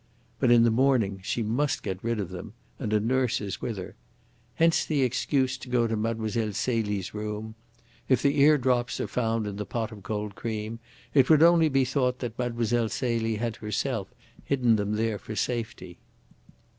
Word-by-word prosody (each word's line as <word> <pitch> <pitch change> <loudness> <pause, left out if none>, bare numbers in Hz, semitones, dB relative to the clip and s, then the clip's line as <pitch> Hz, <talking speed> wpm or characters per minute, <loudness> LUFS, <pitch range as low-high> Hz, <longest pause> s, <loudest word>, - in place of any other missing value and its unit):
But 125 - +3
in 120 -1 +6
the 115 - +4
morning 115 -6 +2
she 115 +4 -1
must 125 +7 0
get 95 0 -4
rid 115 -1 -1
of 100 - -3
them, 95 +4 -8 0.3
and 110 -6 -3
a 105 - +3
nurse 125 +2 +1
is 100 -2 -5
with 115 -4 -3
her. 90 - -7 0.6
Hence 165 0 +3
the 145 -4 +1
excuse 130 +1 0
to 125 - -10
go 125 -1 +2
to 115 -1 -1
Mlle. 110 0 -1 0.3
Celie's 105 -4 -1
room. 105 +1 -5 0.6
If 130 -3 +3
the 140 0 +2
eardrops 130 -4 +3
are - - -1
found 115 -2 -1
in 100 -1 -5
the 105 - -2
pot 115 -1 -3
of 105 -2 -10
cold 105 +1 -4
cream, 110 +1 -4 0.3
it 135 -3 +4
would 155 -1 +7
only 165 -2 +6
be 135 -2 +2
thought 125 -1 0
that 120 -3 -4
Mlle. 120 -1 0
Celie 115 -3 -1
had 115 0 -3
herself 105 0 -2 0.3
hidden 125 -5 +2
them 105 0 -1
there 110 -1 -1
for 110 +3 -7
safety. 110 -7 -3
115 Hz, 180 wpm, -27 LUFS, 105-130 Hz, 0.6 s, would